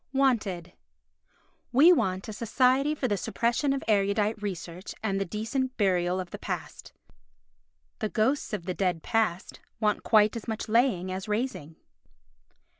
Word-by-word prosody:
Wanted 220 -11 0 1.0
We 310 +8 +7
want 190 - -1
a 215 - -5
Society 255 +6 +2
for 270 - -1
the 205 -3 0
Suppression 235 +7 0
of 275 -1 -1
Erudite 210 +1 +1
Research 180 -2 -6
and 195 -2 0
the - - 0
Decent 235 +7 -3
Burial 180 -3 +1
of 180 -2 -6
the - - -7
Past. - - -6 1.1
The 215 - -1
ghosts 245 +8 0
of 200 -6 -4
the 185 - -2
dead 180 -4 -1
past 215 -6 -1 0.2
want 210 -2 +1
quite 215 -1 +4
as 230 - -6
much 220 0 -3
laying 215 -5 +2
as 190 +2 -5
raising. 210 - -3
210 Hz, 145 wpm, -28 LUFS, 185-240 Hz, 1.1 s, We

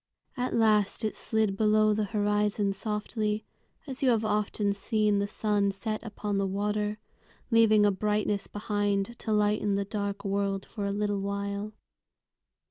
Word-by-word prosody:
At 250 -2 -1
last 215 -1 +3
it 215 - -1
slid 220 -3 0
below 215 0 +4
the 210 0 0
horizon 205 -1 +1
softly, 210 +1 -2 0.4
as 270 -3 -5
you 265 - +4
have 225 -2 +2
often 210 -1 0
seen 210 0 +1
the 200 - 0
sun 205 -1 +1
set 215 +2 -3
upon 210 -2 -3
the 195 - +1
water, 210 +2 -1 0.5
leaving 220 -2 +5
a 205 - +4
brightness 210 0 0
behind 205 +1 -1
to 220 - -3
lighten 210 -1 +2
the 200 0 -1
dark 200 -1 -4
world 195 0 -1
for 205 -3 -4
a - - -1
little 205 0 -1
while. 200 +1 -3
210 Hz, 150 wpm, -28 LUFS, 200-215 Hz, 0.5 s, leaving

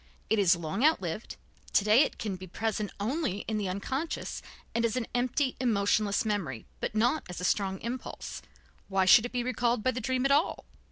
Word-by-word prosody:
It 220 - +4
is 190 -2 +5
long 170 - -3
outlived, 215 - +1 0.4
to 200 - +4
day 215 +5 +6
it - - +1
can 210 -4 -3
be 185 0 -9
present 215 +2 -2
only 230 - -1
in 220 -1 -1
the 200 -3 -2
unconscious 265 - -3 0.3
and 235 - +1
as 230 0 +1
an 250 -2 -1
empty, 255 +2 0
emotionless 210 -2 +2
memory, 185 - -2
but - - -3
not 245 +8 +2
as 180 - -6
a - - -5
strong 190 -1 0
impulse. 245 +3 -5 0.5
Why 195 -1 +2
should 220 +5 +7
it - - -17
be 245 -1 -1
recalled 240 -2 0
by 255 - +3
the 250 0 -4
dream 255 +3 0
at 275 - +3
all!" 290 +4 +2
220 Hz, 200 wpm, -29 LUFS, 195-250 Hz, 0.5 s, should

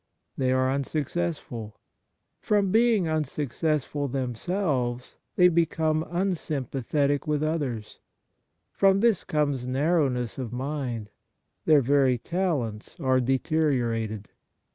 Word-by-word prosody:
They 130 -1 +1
are 130 0 +2
unsuccessful. 140 -5 -3 0.6
From 205 -3 +1
being 225 -5 +3
unsuccess 150 -1 -1
ful 145 -1 -3
themselves, 125 - -2 0.2
they 180 - +6
become 160 -2 +1
unsympathetic 145 - -1
with 150 0 0
others. 140 -9 -3 0.7
From 195 0 +3
this 230 -3 +3
comes 145 -6 -1
narrowness 135 -4 0
of 125 -4 -4
mind; 125 -4 -4 0.5
their 155 -3 +6
very 135 -1 +3
talents 140 - -2
are 130 -1 +2
deteriorated. 125 - 0
145 Hz, 100 wpm, -26 LUFS, 125-160 Hz, 0.7 s, they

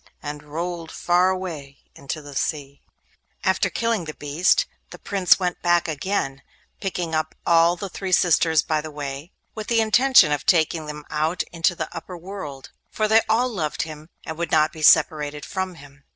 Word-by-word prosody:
and 145 0 -5
rolled 165 +2 -5
far 180 +1 +2
away 165 -7 -5 0.2
into 145 +2 -6
the 145 -1 -10
sea. 140 -1 -3 0.6
After 190 - +2
killing 230 -6 -1
the 155 - -7
beast, 155 - +2 0.2
the - - -10
Prince 195 -3 +3
went 180 -2 -2
back 175 -1 +2
again, 150 -3 -2 0.4
picking 180 -4 -3
up 155 0 -1
all 170 +1 +4
the 195 +3 -5
three 190 +1 -5
sisters 165 -3 +4
by 155 -1 0
the 155 - -7
way, 145 +1 -6 0.2
with 215 -1 -6
the 230 -1 +2
intention 225 - +5
of 145 -1 -1
taking 160 -2 +2
them 150 0 -7
out 155 +4 0
into 170 +1 +1
the 160 -2 -3
upper 175 +2 -7
world: 165 -7 -8 0.2
for 215 - 0
they 220 +1 +5
all 235 +3 +3
loved 165 -10 -2
him 155 0 -10 0.2
and 160 0 -6
would 170 -2 -2
not 155 0 +3
be 160 - -9
separated 150 -1 +4
from 190 -2 -4
him. 145 -2 -16
165 Hz, 180 wpm, -23 LUFS, 150-185 Hz, 0.6 s, intention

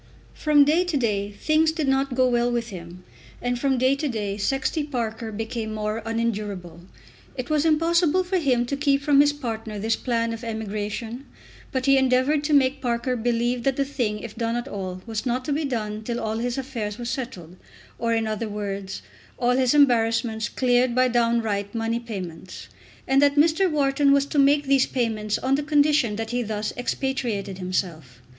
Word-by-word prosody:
From 295 -2 +4
day 320 +5 +3
to 350 -5 -1
day 205 -5 0
things 310 +9 +2
did 315 -3 -2
not 270 -1 +1
go 255 0 +4
well 240 0 +1
with 235 -1 -2
him, 180 -2 -10 0.4
and 245 0 -2
from 270 0 +1
day 260 +2 +3
to 295 - -1
day 205 -4 -2
Sexty 270 +8 -1
Parker 230 -5 -4
became 220 0 -4
more 215 +1 -2
unendurable. 210 -7 -3 0.6
It 255 +4 -4
was 305 0 +2
impossible 335 +2 +3
for 365 +1 0
him 255 -6 +2
to 280 - -2
keep 280 -1 +1
from 280 -1 +5
his 290 0 +4
partner 225 -7 -5
this 225 +2 0
plan 230 -2 -1
of 230 +1 -7
emigration, 220 +3 -4 0.4
but 260 -1 -1
he 275 -1 +5
endeavoured 265 +3 +2
to 300 - +1
make 265 -1 +3
Parker 245 +1 -1
believe 240 +1 0
that 270 +2 +1
the 275 - 0
thing, 235 -7 -2
if 230 -2 -8
done 230 0 -1
at 240 +2 -3
all, 185 -5 -6
was 225 -2 -3
not 250 +1 -1
to 295 - 0
be 300 +1 -1
done 215 -5 -3
till 235 +2 -3
all 220 +1 -2
his 245 +1 -2
affairs 235 -6 -4
were 240 - -6
settled, 230 - -5 0.4
or 230 0 0
in 225 -1 +1
other 215 0 -3
words 200 - -5 0.3
all 245 - +2
his 255 +2 +2
embarrassments 225 -5 +2
cleared 245 -1 +2
by 255 0 +4
downright 230 -4 0
money 230 +1 -1
payments, 185 -7 -8 0.4
and 270 +1 +4
that 285 0 +4
Mr. 320 +5 +4
Wharton 280 -2 +2
was 280 0 +4
to 285 +1 -1
make 285 +1 +4
these 270 -1 +3
payments 220 -4 -1
on 260 +1 0
the 280 - +2
condition 290 -6 +2
that 225 +1 -4
he 245 0 0
thus 215 -2 -3
expatriated 240 -7 -2
himself. 165 -8 -3
240 Hz, 190 wpm, -24 LUFS, 215-275 Hz, 0.6 s, from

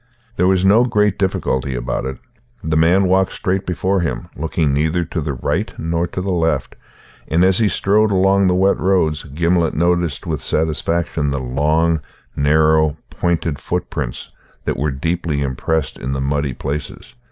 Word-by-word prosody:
There 90 - +2
was 95 0 +2
no 105 +5 +6
great 105 -5 +1
difficulty 65 -9 -1
about - - -3
it. 65 0 -4 0.5
The 80 -1 -1
man 85 +5 +4
walked 95 +1 +2
straight 95 +1 -2
before 95 +2 0
him, 65 -9 -3
looking 80 -1 0
neither 80 +4 +1
to 80 +1 -3
the 70 -1 -2
right 60 - -2
nor 85 +1 -1
to 90 - -5
the 95 +1 -2
left, 80 -6 0 0.5
and 85 +3 +3
as 95 +1 +3
he 110 - +3
strode 105 +3 +2
along 95 0 +3
the 90 - +2
wet 95 +2 +3
roads 80 -5 +1
Gimblet 85 +3 0
noted 85 -2 0
with 80 -4 -3
satisfaction 80 -1 -1
the 70 0 -1
long, 75 +5 +1 0.3
narrow, 80 +1 +3
pointed 85 -4 -1
footprints - - -4 0.3
that - - -1
were 75 +2 0
deeply 80 +1 -2
impressed 70 +1 -2
in 65 +2 -3
the 70 - -2
muddy 70 -1 -1
places. 70 +4 -5
80 Hz, 165 wpm, -19 LUFS, 75-90 Hz, 0.5 s, no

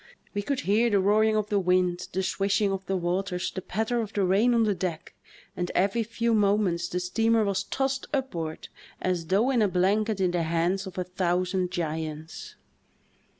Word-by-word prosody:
We 205 - -1
could 270 +5 -2
hear 220 +4 +2
the 205 -3 +3
roaring 215 +3 +3
of 215 -1 0
the 205 -2 +2
wind, 180 -1 +1
the 190 +1 -1
swishing 195 +1 +1
of 195 0 -3
the 190 - 0
waters, 180 +1 -2
the 185 - -5
patter 220 +6 -1
of 220 -1 -6
the 200 - +1
rain 205 +7 +3
on 230 - +4
the 210 -2 +2
deck, 175 -3 -4 0.4
and 175 0 -2
every 200 +5 +2
few 230 +1 -1
moments 200 -5 +2
the 180 - -2
steamer 225 +5 +2
was 200 -1 -1
tossed 270 0 -2
upward 175 - -3 0.3
as 180 -3 -1
though 210 +9 +2
in 245 -4 +2
a 210 - +4
blanket 200 +3 +1
in 185 -2 +2
the 175 -1 0
hands 170 +4 0
of 185 - -10
a 180 - 0
thousand 180 0 -1
giants. 160 - -5
195 Hz, 190 wpm, -27 LUFS, 180-215 Hz, 0.4 s, on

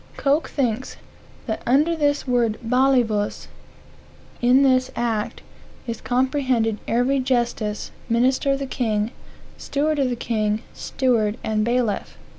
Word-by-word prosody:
Coke 290 +3 +1
thinks 255 -3 -2 0.5
"that 220 -3 -3
under 300 +7 +3
this 290 -3 0
word 235 -3 +1
balivus, 245 -5 +1 0.9
in 250 +3 +5
this 255 -1 +3
act, 225 -3 -2 0.4
is 230 -2 -5
comprehended 255 -3 +1
every 250 +4 +2
justice, 240 -5 -1 0.2
minister 255 +4 +2
of - - 0
the 275 - -4
king, 220 -4 -1 0.5
steward 300 +1 -1
of 265 -2 +2
the 245 - -1
king, 215 -1 -1
steward 230 -5 0
and 215 -1 0
bailiff." 235 -3 -1
245 Hz, 120 wpm, -22 LUFS, 225-270 Hz, 0.9 s, in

